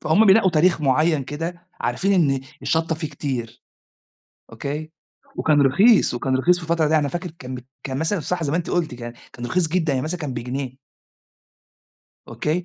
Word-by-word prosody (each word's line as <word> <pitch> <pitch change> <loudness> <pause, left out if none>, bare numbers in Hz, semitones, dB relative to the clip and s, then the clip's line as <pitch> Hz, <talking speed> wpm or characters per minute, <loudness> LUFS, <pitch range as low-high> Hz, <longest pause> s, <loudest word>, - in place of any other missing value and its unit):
فهُم 185 +8 +4
بينقّوا 195 -1 +6
تاريخ 170 +1 +3
معيّن 150 +1 +2
كده 170 +5 -6
عارفين 195 +1 0 0.2
إن 135 - -1 0.2
الشطة 160 0 +1
فيه 155 -1 -4
كتير، 130 -5 -5 0.9
أوكي، 150 +3 -5 0.5
وكان 150 -2 +3
رخيص، 190 - +5
وكان 130 +2 0
رخيص 175 +7 +3
في 180 - -8
الفترة 165 -1 +1
دي 160 - +3
أنا 145 -2 +1
فاكر 175 +1 -4
كان 130 0 -6
ب - - -6 0.2
كان 130 -1 -3
مثلًا 170 +5 0
صح 175 +2 -2
زي 145 - -1
ما 165 - +2
أنتِ 175 - -3
قُلتِ 160 -8 -1
يعني، 120 0 -6 0.2
كان 120 - -6
رخيص 170 +7 +1
جدًا، 165 -3 +1
يعني 130 -1 -1
مثلًا 175 +3 -3
كان 145 -5 -4
بجنيه. 130 +1 -4 1.5
أوكي؟ 165 +4 -2
155 Hz, 180 wpm, -22 LUFS, 135-175 Hz, 1.5 s, بينقّوا